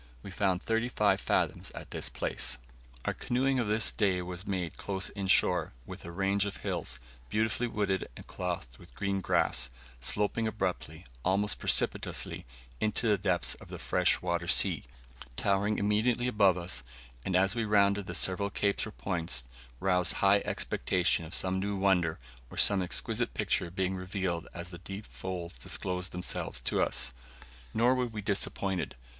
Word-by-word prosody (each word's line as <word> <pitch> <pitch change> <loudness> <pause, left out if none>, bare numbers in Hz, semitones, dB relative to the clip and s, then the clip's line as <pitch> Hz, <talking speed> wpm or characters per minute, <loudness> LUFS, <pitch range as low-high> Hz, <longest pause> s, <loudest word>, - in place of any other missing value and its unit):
We 100 - -8
found 95 0 0
thirty 115 +2 0
five - - +2
fathoms - - 0
at - - -9
this - - -2
place. 65 - -2 0.5
Our - - +1
canoeing 130 +2 +1
of 115 - 0
this 110 +2 +3
day 95 -4 +1
was 90 +1 -6
made 90 -4 -2
close 95 -1 -2
in 100 -2 -4
shore, 90 -5 +3
with - - -9
a 85 - -7
range 100 +2 +1
of 100 - -5
hills, - - -2 0.3
beautifully 110 - +1
wooded 100 -4 -1
and - - -10
clothed 85 -9 -4
with - - -16
green 100 -1 -1
grass, 65 -7 +1 0.3
sloping 105 - +1
abruptly, 90 -6 -3 0.2
almost 100 +2 +2
precipitously, - - +1 0.3
into 110 +2 0
the 105 - +4
depths 90 -10 +1
of - - -11
the - - -7
fresh 90 -1 +2
water 85 -1 -1
sea, - - +4 0.5
towering 100 - +1
immediately 110 +4 +2
above 100 -6 +4
us, 90 +1 -3 0.4
and 95 - -1
as 95 +3 +4
we 115 -1 -1
rounded 100 -2 +3
the - - -4
several 100 +2 +2
capes 100 +1 0
or - - -7
points, 85 -11 0 0.4
roused 90 -2 +2
high 100 +1 +4
expectations 90 -2 0
of 80 - 0
some 95 0 +2
new 100 +1 -1
wonder, 90 -4 +2 0.3
or - - -11
some 100 -2 +5
exquisite 90 - +1
picture 85 - 0
being 95 +1 -1
revealed 90 -2 -3
as 85 +1 -7
the 85 - -9
deep 95 +4 -7
folds 90 -2 -6
disclosed 90 0 -2
themselves 90 -7 -3
to - - 0
us. - - +2 0.6
Nor 120 +3 +4
were 125 -1 0
we 110 -3 -6
disappointed. 95 -2 -1
95 Hz, 165 wpm, -31 LUFS, 90-105 Hz, 0.6 s, some